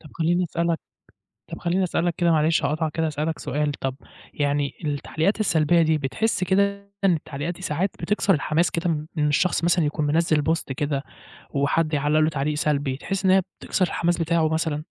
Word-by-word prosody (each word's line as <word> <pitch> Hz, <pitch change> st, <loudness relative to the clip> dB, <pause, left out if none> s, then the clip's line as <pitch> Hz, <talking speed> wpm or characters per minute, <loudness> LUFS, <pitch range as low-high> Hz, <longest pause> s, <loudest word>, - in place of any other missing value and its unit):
طَب 155 Hz, -, -14 dB
خلّيني 175 Hz, +2 st, +1 dB
أسألك 170 Hz, -1 st, -1 dB, 0.7 s
طَب -, -, -6 dB
خلّيني 180 Hz, +2 st, 0 dB
أسألك 175 Hz, -1 st, 0 dB
كده 170 Hz, -1 st, +3 dB
معلش 155 Hz, 0 st, +2 dB
هاقاطعك 155 Hz, +2 st, 0 dB
كده 165 Hz, +1 st, -1 dB
أسألك 155 Hz, +1 st, -2 dB
سؤال، 150 Hz, +2 st, -1 dB
طَب 135 Hz, -2 st, -4 dB, 0.4 s
يعني 145 Hz, -1 st, 0 dB
التعليقات 155 Hz, +7 st, -1 dB
السلبية 170 Hz, -4 st, +3 dB
دي 160 Hz, -1 st, +3 dB
بتحس 175 Hz, +9 st, -1 dB
كده 200 Hz, +2 st, +1 dB, 0.2 s
إن 195 Hz, -2 st, +5 dB
التعليقات 150 Hz, +1 st, -4 dB
دي 180 Hz, -, -14 dB
ساعات 180 Hz, +2 st, 0 dB
بتكسر 205 Hz, -1 st, +1 dB
الحماس 160 Hz, +2 st, +1 dB
كده 165 Hz, -3 st, -1 dB
إن 150 Hz, -1 st, +2 dB
الشخص 170 Hz, +4 st, +1 dB
مثلًا 170 Hz, -1 st, +3 dB
يكون 150 Hz, +1 st, -1 dB
منزِّل 155 Hz, 0 st, +2 dB
post 165 Hz, -, -2 dB
كده 145 Hz, -2 st, -1 dB, 0.5 s
وحد 155 Hz, +3 st, +1 dB
يعلق 145 Hz, +2 st, +2 dB
له 155 Hz, -, +4 dB
تعليق 150 Hz, 0 st, -1 dB
سلبي 145 Hz, -3 st, 0 dB
تحس 195 Hz, +7 st, -4 dB
إن 190 Hz, -, +4 dB
هي 190 Hz, 0 st, +5 dB, 0.2 s
بتكسر 185 Hz, -, 0 dB
الحماس 175 Hz, 0 st, 0 dB
بتاعه 165 Hz, -1 st, +2 dB
مثلًا؟ 160 Hz, -2 st, -1 dB
160 Hz, 180 wpm, -24 LUFS, 150-175 Hz, 0.7 s, إن